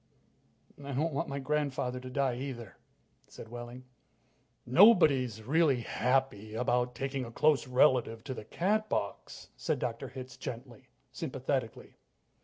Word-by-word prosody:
"I 140 0 -5
don't 155 +4 0
want 135 - -2
my 140 - -3
grandfather 135 -3 -1
to 130 0 -8
die, 130 -1 0
either," 125 -5 -6 0.5
said 110 - -11
Wehling. 120 +1 -8 0.8
"Nobody's 135 - +5
really 140 -1 +3
happy 120 -3 0
about 125 +1 0
taking 135 +1 -3
a 115 - -8
close 150 +2 +2
relative 125 -3 +3
to 130 - -5
the 110 - -8
Catbox," 215 - -2
said 155 -4 -1
Dr. 120 -2 -3
Hitz 130 -1 -9
gently, 120 -2 -8 0.2
sympathetically. - - -4
130 Hz, 125 wpm, -31 LUFS, 120-140 Hz, 0.8 s, Nobody's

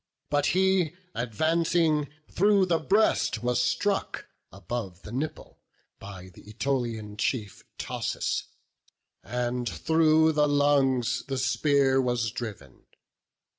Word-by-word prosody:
But 145 -1 +2
he, 190 -4 +2 0.2
advancing, 155 - +1 0.2
through 200 0 +3
the 170 -3 +1
breast 205 - +1
was 125 0 +1
struck 200 +9 -1 0.3
Above 95 -1 -6
the 105 - -9
nipple, 140 +6 -5 0.4
by 95 -2 -10
th' 90 - -16
Ætolian 115 -3 -3
chief. 110 -4 -2
Thoas; - - -3 0.8
and 120 0 -2
through 160 0 +3
his 155 - -2
lungs 145 -4 +2
the 135 -1 -3
spear 135 +1 +2
was 120 -3 -1
driv'n. 100 - -8
130 Hz, 105 wpm, -27 LUFS, 120-155 Hz, 0.8 s, through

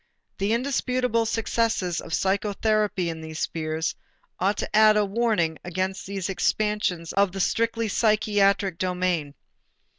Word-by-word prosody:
The 200 +2 0
indisputable 250 -2 0
success 230 0 0 0.2
of - - -10
psychotherapy 200 -1 0
in 165 -1 -4
these 160 0 -7
spheres 160 0 -2 0.5
ought 200 +2 +1
to - - -3
add 215 0 +6
a 210 - +3
warning 200 -7 0
against 185 +2 -3
these 195 -2 -3
expansions 195 -3 -1
of 200 -2 +2
the 195 - -5
strictly 230 +3 0
psychiatric 205 -4 +2
domain. 180 -5 -1
200 Hz, 125 wpm, -25 LUFS, 180-220 Hz, 0.5 s, add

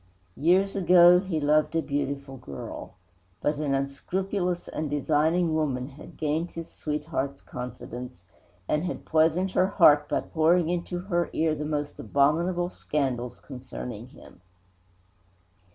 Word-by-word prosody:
Years 185 +7 +3
ago 180 -2 +7
he 185 -4 -2
loved 150 +2 +2
a 165 - +3
beautiful 140 -1 -3
girl. 70 - -8 0.4
But 150 0 0
an 145 -2 0
unscrupulous 180 +6 -2
and 155 -1 -3
designing 155 +4 +1
woman 135 -5 -1
had 140 +1 -13
gained 155 +2 -1
his 165 -1 -8
sweetheart's 150 -2 -3
confidence 125 -5 -8 0.4
and 150 +1 +1
had 180 - -5
poisoned 165 +4 +2
her 185 - +3
heart 150 -7 +5
by - - +1
pouring 165 +1 +2
into 175 0 -2
her 175 -3 -1
ear 160 0 +1
the 150 0 -4
most 150 -1 -3
abominable 170 +5 +1
scandals 130 -8 -2
concerning 125 -3 -8
him. 90 - -16
155 Hz, 130 wpm, -27 LUFS, 140-175 Hz, 0.4 s, ago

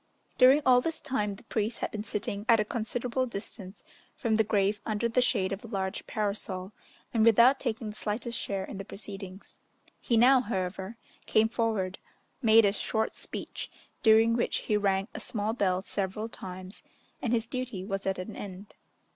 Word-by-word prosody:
During 265 +4 +7
all 250 -1 +6
this 325 +3 -2
time, 210 -9 -1
the 230 - -16
priest 220 0 -2
had - - -3
been 210 -1 -4
sitting 205 -1 -3
at 230 -1 +7
a 210 - +2
considerable 240 +3 -2
distance 200 -3 -8 0.3
from 230 -4 -1
the 220 0 +4
grave 205 -1 +1
under 215 +1 0
the 235 +2 +2
shade 200 -6 +2
of 195 +1 -4
a - - -8
large 195 -2 -3
parasol, 200 -2 -2 0.4
and 225 -2 +3
without 235 +4 +6
taking 225 -3 -3
the - - -13
slightest 230 +3 -3
share 195 -1 -3
in 195 - -8
the - - -4
proceedings. 195 -1 -9 0.4
He 235 - +1
now, 255 +3 +6
however, 190 -1 -3 0.3
came 220 +1 +4
forward, 215 -5 -1 0.4
made 225 -2 +6
a 200 - +3
short 220 +2 -1
speech, - - -6 0.3
during 225 +1 +6
which 240 - 0
he 215 - 0
rang 195 -1 +1
a - - -5
small 215 0 -2
bell 190 -5 +1
several 200 +2 -3
times, 185 -3 -9 0.4
and 240 - -1
his 230 -2 +1
duty 240 -6 -4
was 195 -1 -3
at 190 - 0
an 185 +4 -6
end. 195 0 -8
215 Hz, 180 wpm, -29 LUFS, 195-230 Hz, 0.4 s, During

